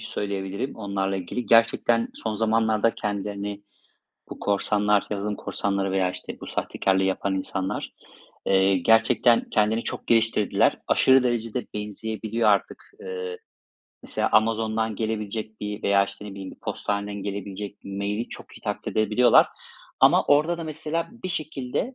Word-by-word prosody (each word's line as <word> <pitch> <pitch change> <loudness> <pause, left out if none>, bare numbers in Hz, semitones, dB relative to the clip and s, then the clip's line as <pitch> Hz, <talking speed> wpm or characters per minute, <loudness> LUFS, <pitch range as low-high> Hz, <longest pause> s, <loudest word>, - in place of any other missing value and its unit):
söyleyebilirim 100 +5 -3
onlarla 100 -2 -2
ilgili, 95 +7 -4
gerçekten 115 0 +4
son 110 -1 -3
zamanlarda 110 0 +2
kendilerini 100 -1 -4 0.7
bu - - -7
korsanlar, 105 0 +2
yazılım 105 0 -2
korsanları 100 -1 -2
veya 95 -1 +2
işte - - -8
bu - - -8
sahtekârlığı 95 0 0
yapan 95 0 0
insanlar, 95 0 -3 0.6
ııı, 95 0 +4
gerçekten 115 +5 +4
kendini 110 +2 +2
çok - - -5
geliştirdiler. 115 -2 +2
Aşırı 130 0 +5
derecede 120 -1 -1
benzeyebiliyor 110 +2 -2
artık. 100 -2 0
Iıı, 90 -1 -5 0.6
mesela - - -1
Amazon'dan 110 0 +2
gelebilecek 110 0 -3
bir 105 0 -5
veya 100 0 +4
işte 100 +1 -9
ne 105 - -7
bileyim 95 -1 -7
bir - - -15
postaneden 100 0 -3
gelebilecek 100 0 -5
mail'i 100 +3 -3
çok - - -11
iyi - - -22
taklit - - -4
edebiliyorlar, 110 +3 +5 0.5
ama - - +6
orada 155 +4 +3
da 165 - -4
mesela 155 +1 -3 0.2
bir - - -1
şekilde 155 - -3
105 Hz, 135 wpm, -25 LUFS, 100-115 Hz, 0.7 s, ama